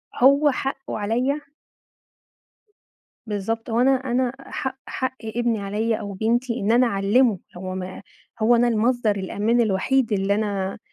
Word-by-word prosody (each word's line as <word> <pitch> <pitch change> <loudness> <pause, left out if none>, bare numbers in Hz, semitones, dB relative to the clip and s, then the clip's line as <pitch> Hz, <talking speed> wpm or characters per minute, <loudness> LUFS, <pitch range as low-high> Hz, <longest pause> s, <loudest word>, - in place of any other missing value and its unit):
هو 280 +3 +5
حقه 270 -1 -4
عليّا 250 +8 0 1.9
بالضبط 225 +3 -3
وأنا 245 +4 +3
أنا 255 -1 +1
حق 265 -1 -4
حق 260 0 -3
ابني 230 0 -1
عليّا 215 +3 -1
أو 205 -2 -6
بنتي 235 +4 0
إن 210 +3 +1
أنا 245 +1 +5
أعلمه 205 +1 +2 0.2
هو 185 +1 -5
ما 185 +1 -6 0.4
هو 235 +2 +5
أنا 240 +1 +3
المصدر 230 -1 +1
الأمان 210 +5 0
الوحيد 225 +4 +1
اللي 200 0 +1
أنا 200 -2 -2
230 Hz, 130 wpm, -23 LUFS, 205-250 Hz, 1.9 s, هو